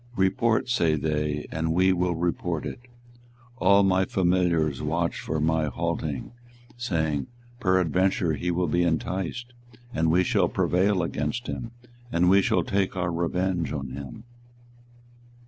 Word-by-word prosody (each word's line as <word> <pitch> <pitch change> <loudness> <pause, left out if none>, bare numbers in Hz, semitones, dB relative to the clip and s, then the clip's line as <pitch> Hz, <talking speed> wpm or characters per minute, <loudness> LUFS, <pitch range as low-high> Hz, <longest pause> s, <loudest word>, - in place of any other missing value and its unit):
Report, 110 +5 +2
say 85 -11 +2
they, 75 -1 -1
and 80 0 -1
we 95 +1 +4
will 90 -1 0
report 85 -1 -2
it. - - -5 0.8
All 100 +2 +5
my 95 -1 +3
familiars 85 -7 +1
watched 85 +3 -1
for 80 - -3
my 80 +1 +1
halting, 75 - -3 0.4
saying, 80 - -1 0.3
Peradventure 95 -2 +2
he 90 +4 -2
will 90 +1 +1
be 85 +2 +1
enticed, 95 +8 -2 0.4
and 80 -3 +1
we 90 +3 +4
shall - - +2
prevail 95 0 +1
against 120 +8 -2
him, 115 - -5 0.4
and 90 +2 +3
we 100 +1 +6
shall 90 -2 +1
take 95 +2 -1
our 90 -2 -1
revenge 85 +1 -1
on 70 -3 -4
him. 70 - -8
90 Hz, 135 wpm, -26 LUFS, 80-95 Hz, 0.8 s, we